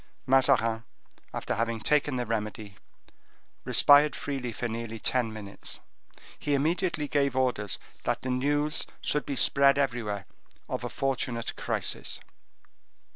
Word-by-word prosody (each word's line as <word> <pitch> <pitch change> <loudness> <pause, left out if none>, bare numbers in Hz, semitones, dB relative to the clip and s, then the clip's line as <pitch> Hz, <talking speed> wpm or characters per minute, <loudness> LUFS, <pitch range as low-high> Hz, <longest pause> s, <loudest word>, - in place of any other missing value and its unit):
Mazarin, 120 -4 +3 0.5
after - - -2
having 115 +1 -1
taken 145 +3 +2
the 125 -1 -1
remedy, 105 -2 -3 0.9
respired 145 0 +6
freely 135 -4 -3
for 120 +2 -3
nearly 115 0 -4
ten 120 0 +1
minutes. 100 -2 -6 0.6
He 145 - +1
immediately 160 +1 0
gave 140 -2 +1
orders 110 -7 0 0.3
that - - -1
the 130 - -1
news 145 +4 +1
should 150 - -1
be 140 - -2
spread 140 +1 +4
everywhere 115 -7 -1 0.4
of - - -3
a - - -2
fortunate 130 -3 -2
crisis. - - -2
125 Hz, 125 wpm, -28 LUFS, 115-140 Hz, 0.9 s, respired